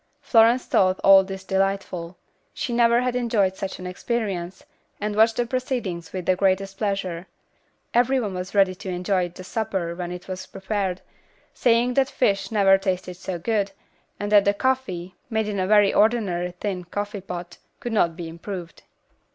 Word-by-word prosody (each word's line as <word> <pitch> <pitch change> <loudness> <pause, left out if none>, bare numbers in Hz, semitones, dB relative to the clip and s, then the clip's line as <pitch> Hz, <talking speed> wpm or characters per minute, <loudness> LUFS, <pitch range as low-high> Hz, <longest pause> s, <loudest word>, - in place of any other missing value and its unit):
Florence 245 -3 +4
thought 185 -1 +2
all 195 0 +8
this 190 0 -7
delightful. 190 -3 -2 0.4
She 245 - -3
had - - 0
never 235 0 +5
enjoyed 230 -6 +1
such 190 0 -5
an 185 - -9
experience, 185 -2 -3 0.4
and 210 0 -2
watched 220 +1 +4
the 240 - +1
proceedings 240 -9 -3
with 185 -2 -5
the 185 - +3
greatest 195 +1 0
pleasure. 190 -4 -2 0.7
Every 255 +3 +3
one 210 -5 -3
was 180 +2 -6
ready 195 -2 +4
to 185 +1 -8
enjoy 180 0 0
the 180 +2 -11
supper 190 -4 -2
when 175 0 -5
it 180 0 -8
was 185 0 -6
prepared, 190 -2 -3 0.5
saying 240 +1 +2
that 270 +1 +2
fish 200 -6 +1
never 195 -3 +5
tasted 185 -2 -2
so 180 0 -5
good, 200 +2 -1 0.5
and 205 0 -3
that 205 -1 +6
the 200 0 +3
coffee, 200 -8 -1 0.2
made 220 -2 0
in 205 -2 -2
a 185 - 0
very 205 -1 +5
ordinary 190 -6 +1
tin 190 -4 -3
coffee 205 +3 -4
pot, 175 -2 -7 0.2
could 240 - -4
not 170 -6 +2
be 170 -1 -6
improved. 170 +1 -7
195 Hz, 170 wpm, -24 LUFS, 180-220 Hz, 0.7 s, all